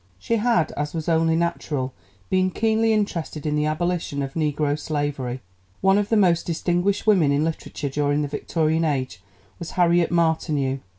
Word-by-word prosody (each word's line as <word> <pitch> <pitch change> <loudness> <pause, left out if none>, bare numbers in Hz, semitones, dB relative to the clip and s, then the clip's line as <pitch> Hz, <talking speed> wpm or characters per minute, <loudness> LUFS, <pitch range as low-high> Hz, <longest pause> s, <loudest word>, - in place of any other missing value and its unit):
She 230 - -1
had, 210 -8 +2
as 145 +2 -4
was 160 -1 -4
only 165 -1 +3
natural, 150 -6 -2 0.4
been 185 0 +3
keenly 225 +3 +1
interested 170 -8 -2
in 150 -1 0
the 150 0 +1
abolition 160 -2 -1
of 135 0 -5
negro 150 -2 0
slavery. 145 -4 -3 0.4
One 195 +1 +4
of 205 0 -2
the 225 - +3
most 175 -4 +3
distinguished 175 +4 0
women 185 -10 +4
in 140 +2 +2
literature 160 -2 -3
during 145 +1 0
the - - -2
Victorian 160 +2 0
Age 130 - -2 0.4
was 170 - -6
Harriet 175 -1 +3
Martineau. 155 -5 +1
160 Hz, 165 wpm, -23 LUFS, 145-175 Hz, 0.4 s, One